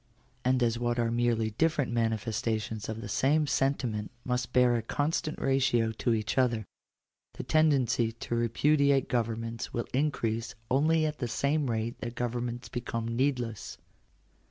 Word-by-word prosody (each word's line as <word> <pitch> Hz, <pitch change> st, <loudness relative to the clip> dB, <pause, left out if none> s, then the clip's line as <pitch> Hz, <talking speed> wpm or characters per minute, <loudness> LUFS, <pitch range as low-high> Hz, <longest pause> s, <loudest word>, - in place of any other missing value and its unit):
And 130 Hz, 0 st, +2 dB
as 115 Hz, 0 st, +1 dB
what 120 Hz, 0 st, 0 dB
are 115 Hz, -1 st, +1 dB
merely 115 Hz, -2 st, +1 dB
different 145 Hz, +2 st, +1 dB
manifestations 110 Hz, -1 st, -1 dB
of 110 Hz, 0 st, -4 dB
the 105 Hz, -, -6 dB
same 150 Hz, +8 st, +2 dB
sentiment 125 Hz, -7 st, 0 dB, 0.2 s
must 125 Hz, -1 st, -1 dB
bear 125 Hz, -1 st, +4 dB
a 115 Hz, -, 0 dB
constant 155 Hz, +6 st, -1 dB
ratio 125 Hz, -4 st, +2 dB
to 115 Hz, +1 st, 0 dB
each 110 Hz, +4 st, -1 dB
other, 120 Hz, -4 st, +1 dB, 0.7 s
the -, -, -5 dB
tendency 130 Hz, -7 st, +2 dB
to 115 Hz, -, -6 dB
repudiate 140 Hz, +4 st, +3 dB
governments 115 Hz, -1 st, -2 dB
will 120 Hz, -, -1 dB
increase 115 Hz, -5 st, -1 dB, 0.2 s
only 155 Hz, +4 st, +3 dB
at 150 Hz, 0 st, -3 dB
the 120 Hz, -, -1 dB
same 140 Hz, +3 st, 0 dB
rate 115 Hz, 0 st, -2 dB
that 120 Hz, -, -5 dB
governments 120 Hz, 0 st, -3 dB
become 115 Hz, -2 st, -3 dB
needless. 125 Hz, -4 st, -1 dB
120 Hz, 145 wpm, -29 LUFS, 115-135 Hz, 0.7 s, bear